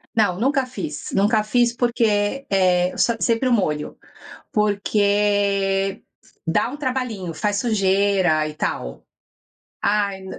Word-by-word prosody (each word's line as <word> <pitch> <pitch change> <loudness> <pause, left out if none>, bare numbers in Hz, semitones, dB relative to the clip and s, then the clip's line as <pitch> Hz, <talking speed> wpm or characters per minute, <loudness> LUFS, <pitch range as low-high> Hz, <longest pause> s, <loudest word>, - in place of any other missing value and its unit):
Não, 205 -5 +2
nunca 270 +2 +1
fiz, 265 +4 -6
nunca 210 0 +2
fiz, 240 +2 +1
porque, 235 +1 0
eh, 180 -2 +2 0.3
sempre 230 +2 +1
o 250 - +3
molho, 150 -8 -1 0.6
porque 200 -2 +1 0.4
dá 165 - +1
um 270 - -6
trabalhinho, 250 - -3
faz 205 +4 -1
sujeira 195 -7 +2
e 150 - -8
tal. 60 - -4 0.8
Ai 200 -2 0
205 Hz, 110 wpm, -21 LUFS, 195-235 Hz, 0.8 s, o